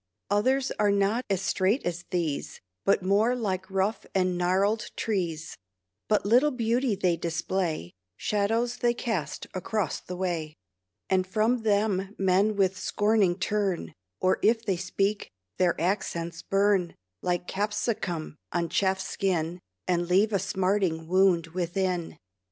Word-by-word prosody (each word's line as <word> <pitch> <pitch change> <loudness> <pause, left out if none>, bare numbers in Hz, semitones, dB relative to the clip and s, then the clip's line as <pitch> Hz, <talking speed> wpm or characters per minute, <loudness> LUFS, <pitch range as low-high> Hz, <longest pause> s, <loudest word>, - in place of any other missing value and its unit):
Others 260 +6 +2
are 210 -1 +4
not 200 +5 +1
as 195 -1 0
straight 195 +7 +1
as 175 0 -3
these, 165 -5 -2 0.3
But 195 -1 +3
more 210 +6 +3
like 190 -5 -2
rough 195 +3 0
and 185 -1 +2
gnarled 190 +5 +1
trees; 170 -7 -2 0.5
But 210 -2 +2
little 245 +8 +5
beauty 240 -2 +1
they 185 -3 +1
display; 165 - -2 0.2
Shadows 225 +4 0
they 240 -1 +1
cast 190 - -3
across 185 -3 -2
the 180 - -7
way; 170 -4 -2 0.5
And 185 -1 +1
from 220 +6 +2
them 205 -2 +1
men 195 +3 +3
with 190 -1 +1
scorning 205 -4 +2
turn, 200 -2 -1 0.3
Or, 185 - +2
if 225 +1 +3
they 195 -4 +1
speak, 195 +3 -1 0.3
their 180 -2 +2
accents 170 -2 -1
burn 195 -3 +2 0.3
Like 175 0 -1
capsicum 205 -6 -2
on 170 -1 -1
chafed 190 -1 +1
skin, 175 -3 -1 0.3
And 175 -1 +1
leave 205 +4 +3
a 200 - +3
smarting 185 -3 0
wound 185 -2 +4
within. 180 -1 -1
190 Hz, 135 wpm, -27 LUFS, 180-210 Hz, 0.5 s, little